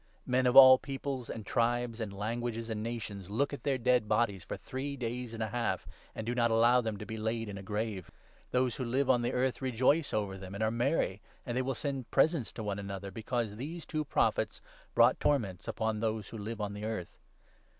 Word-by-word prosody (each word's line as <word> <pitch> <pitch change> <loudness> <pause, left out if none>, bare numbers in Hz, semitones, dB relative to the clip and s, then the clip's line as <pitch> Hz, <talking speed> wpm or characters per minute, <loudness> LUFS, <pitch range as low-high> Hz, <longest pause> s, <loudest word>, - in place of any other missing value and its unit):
Men 125 0 +2
of 125 - +2
all 130 -1 +11
peoples, 135 -2 -4
and 110 - -6
tribes, 120 0 0
and 105 -3 -3
languages, 115 +3 -3
g 115 - -6
and 105 -1 -2
nations 110 -4 -5
look 140 +8 0
at 145 - -5
their 140 -2 +1
dead 125 -2 +2
bodies 105 -4 +1
for - - -5
three 140 +2 -5
days 120 -1 -4
and 115 -1 -3
a 110 - -2
half, 120 +1 -1 0.3
and 110 - -4
do 120 - -1
not 120 -1 +2
allow 120 +2 +5
them 110 -3 -3
to 105 - -7
be 110 - -5
laid 110 +1 -2
in 100 - -6
a 95 - -6
grave. 105 -2 -3 0.4
Those 125 -2 +1
who 130 - -2
live 130 +3 +1
10 130 - +5
on 120 - +1
the 120 - 0
earth 130 +1 0
rejoice 130 +5 +2
over 100 -3 -2
them 95 0 -8
and 105 - -1
are 110 - +2
merry, 120 - 0 0.2
and 120 - -3
they 130 - +2
will 130 0 -2
send 135 -3 -3
presents 150 -2 +2
to 110 - -6
one 100 -1 -2
another, 100 -1 -5
because 110 0 -3
these 160 +7 -6
two 155 -2 -2
Prophets 145 - +1 0.4
brought - - +5
torments 105 -11 0
upon 110 -1 -1
those 110 -2 -2
who 115 - -7
live 110 +2 -5
on 105 -1 -3
the 105 +1 -7
earth. 110 -5 -4
115 Hz, 225 wpm, -32 LUFS, 105-130 Hz, 0.4 s, all